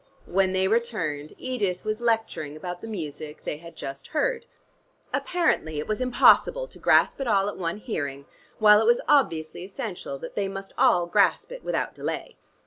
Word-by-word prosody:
When 190 +1 +2
they 190 0 +2
returned, 185 -10 -1
Edith 205 -9 -2
was 215 +2 -2
lecturing 225 -10 -1
about 175 +2 -6
the - - -7
music 155 -6 -6
they - - -3
had 170 +1 -12
just 135 0 -7
heard. 465 +10 -1 0.7
Apparently 305 - 0
it 150 - -3
was 215 +3 -2
impossible 255 - +4
to - - -15
grasp - - +4
it 270 - -2
all 200 -3 +3
at 205 - -3
one 170 0 -3
hearing, 140 - -4 0.3
while 210 0 +7
it 225 - +1
was 240 0 +4
obviously 170 - +2
essential 195 - -6
that - - -8
they 200 -1 -1
must 195 0 -7
all 175 -1 +4
grasp 170 - +2
it - - -8
without - - -2
delay. - - -5
195 Hz, 175 wpm, -26 LUFS, 160-235 Hz, 0.7 s, while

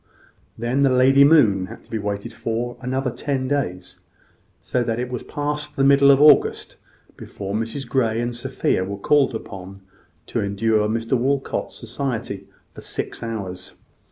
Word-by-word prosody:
Then 120 +4 0
the 140 - +5
lady 130 +2 +5
moon 110 -12 +5
had - - -11
to - - -21
be 110 - -2
waited 105 +3 -4
for 115 +2 -3
another 130 0 -2
ten 135 0 -2
days; 95 -11 -3 0.6
so 125 - -1
that 115 -1 -2
it 125 0 -3
was 125 - -3
past 150 0 -4
the 135 - +1
middle 140 0 +6
of 135 -1 +6
August 150 -1 +4 0.4
before 100 0 -7
Mrs 115 +5 -3
Grey 115 -3 +1
and 120 0 -2
Sophia 120 -5 -1
were 100 +2 -5
called 135 +4 +2
upon 95 -2 -8 0.4
to - - -2
endure 105 +2 +1
Mr 115 +3 0
Walcot's 135 +2 -1
society 115 -4 -4 0.3
for - - -11
six - - -5
hours. 95 -6 -6
120 Hz, 155 wpm, -22 LUFS, 105-135 Hz, 0.6 s, middle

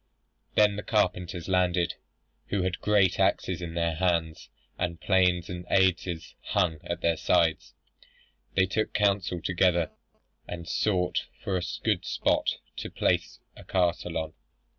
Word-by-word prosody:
Then 105 -1 +4
the - - -2
carpenters 90 -5 0
landed, 90 -2 +2 0.5
who 100 -2 0
had 90 -1 -2
great 100 -4 +3
axes 95 -1 +1
in 85 -1 -5
their 85 -1 +1
hands, 85 -3 0 0.3
and 85 -2 -2
planes 90 -2 +2
and 90 0 -6
adzes 90 -3 +1
hung 80 -3 0
at 85 0 -4
their 85 -1 +2
sides. 85 -1 +1 0.8
They 95 - +5
took 110 +4 -1
counsel 100 -4 +1
together, 85 -2 +2 0.6
and 85 -1 -6
sought 90 -3 0 0.2
for 95 - -1
a 90 - 0 0.2
good - - +1
spot - - +1 0.2
to - - -4
place - - 0
a - - -12
castle 90 -2 0
on. 80 -1 -3
90 Hz, 140 wpm, -28 LUFS, 85-95 Hz, 0.8 s, They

